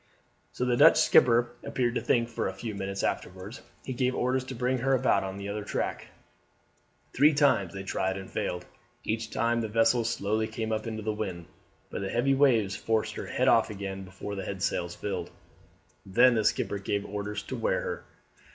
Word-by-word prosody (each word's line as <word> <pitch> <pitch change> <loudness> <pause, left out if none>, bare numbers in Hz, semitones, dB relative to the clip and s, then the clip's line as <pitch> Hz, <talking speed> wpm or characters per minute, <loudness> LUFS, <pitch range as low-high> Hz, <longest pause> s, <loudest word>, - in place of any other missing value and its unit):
So 125 - -2
the 125 -1 +2
Dutch 150 +6 +7
skipper 120 0 +5
appeared 120 -2 -1
to - - -1
think, 120 -1 +2
for 115 - -2
a - - -5
few 115 -3 -5
minutes 100 0 -4
afterwards 95 +6 -4 0.2
he 130 - -3
gave 125 +1 0
orders 130 +1 0
to 130 - -6
bring 125 +2 0
her 135 +3 +1
about 130 -4 +2
on 95 0 -5
the 100 0 -6
other 105 +1 -3
tack. - - -3 1.1
Three 145 +3 +5
times 140 - +3
they 95 0 -6
tried 95 0 -1
and 95 -1 -7
failed; 90 -4 -3 0.4
each 110 +1 -2
time 115 0 +1
the 110 - -2
vessel 115 +2 +3
slowly 110 0 -1
came 110 0 -4
up 110 +1 -2
into 110 -1 -4
the 110 0 -1
wind, 95 -6 -4 0.5
but - - -4
the 95 - -3
heavy 125 +5 +2
waves 120 -8 +3
forced 110 +2 -1
her - - -6
head - - 0
off - - +5
again 95 -2 -5
before 95 +2 -7
the 100 - -4
headsails 90 -2 -2
filled. 95 -4 -4 0.7
Then 120 +6 +5
the 110 -2 +1
skipper 100 - 0
gave 100 +1 -2
orders 105 +1 -4
to - - -5
wear - - 0
her. 480 -1 -4
110 Hz, 195 wpm, -28 LUFS, 100-125 Hz, 1.1 s, Dutch